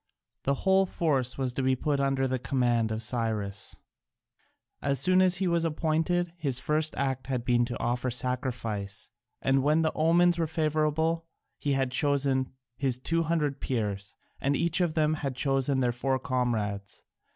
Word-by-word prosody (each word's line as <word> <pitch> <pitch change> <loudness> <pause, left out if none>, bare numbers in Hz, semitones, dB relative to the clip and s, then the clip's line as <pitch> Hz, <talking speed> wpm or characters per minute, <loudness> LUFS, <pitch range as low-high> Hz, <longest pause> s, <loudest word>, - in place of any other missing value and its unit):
The 140 - +2
whole 190 0 +4
force 140 -9 0
was 130 -2 -1
to 135 - -2
be 130 0 +2
put 145 +2 -1
under 135 -1 +1
the 130 0 -1
command 120 -3 +1
of 110 +1 -2
Cyrus. 110 -4 -2 1.0
As 140 -1 +1
soon 185 +6 +5
as 185 -1 +4
he 185 +1 0
was 170 -1 +2
appointed, 165 +2 0
his 140 -6 0
first 155 +3 0
act 135 -2 -1
had 125 -3 -2
been 120 -1 +3
to 120 - -5
offer 125 +1 -1
sacrifice, 115 -5 -3 0.3
and 135 0 +3
when 150 +4 +3
the 160 - 0
omens 170 +2 +3
were 165 - +1
favourable 155 +1 0 0.3
he 145 - 0
had 135 -1 0
chosen 135 -1 +1 0.2
his 130 -1 +1
two 165 +6 0
hundred 150 -4 0
Peers, 105 -5 -3 0.2
and 140 +1 +1
each 170 +3 +1
of 170 -2 0
them 155 -1 +2
had 135 -3 -2
chosen 135 0 +1
their 125 -1 +2
four 130 +2 0
comrades. 115 -6 -2
135 Hz, 165 wpm, -28 LUFS, 125-155 Hz, 1.0 s, soon